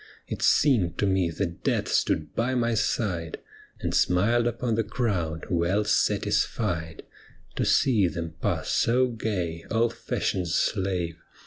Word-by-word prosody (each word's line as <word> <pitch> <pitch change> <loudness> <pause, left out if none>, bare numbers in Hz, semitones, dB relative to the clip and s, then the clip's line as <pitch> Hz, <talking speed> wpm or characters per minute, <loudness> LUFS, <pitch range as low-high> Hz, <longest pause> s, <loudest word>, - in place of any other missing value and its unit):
It - - -5
seemed 100 - +3
to - - +1
me 95 -3 +2
that 85 +1 -4
death - - 0
stood 75 -1 0
by 125 +3 0
my 120 -1 +1
side 90 -7 -1 0.4
And - - -2
smiled 115 +7 +3
upon 120 0 -1
the 115 +1 +1
crowd, 100 -9 -2
well 90 +4 +1
satisfied 85 -5 0 0.5
To - - 0
see 115 -9 +3
them 85 0 -5
pass - - -1
so 125 +2 +2
gay, 90 -8 -3
all 115 +1 +2
fashion's 90 -6 -2
slave. 90 -5 -1
95 Hz, 135 wpm, -26 LUFS, 85-115 Hz, 0.5 s, seemed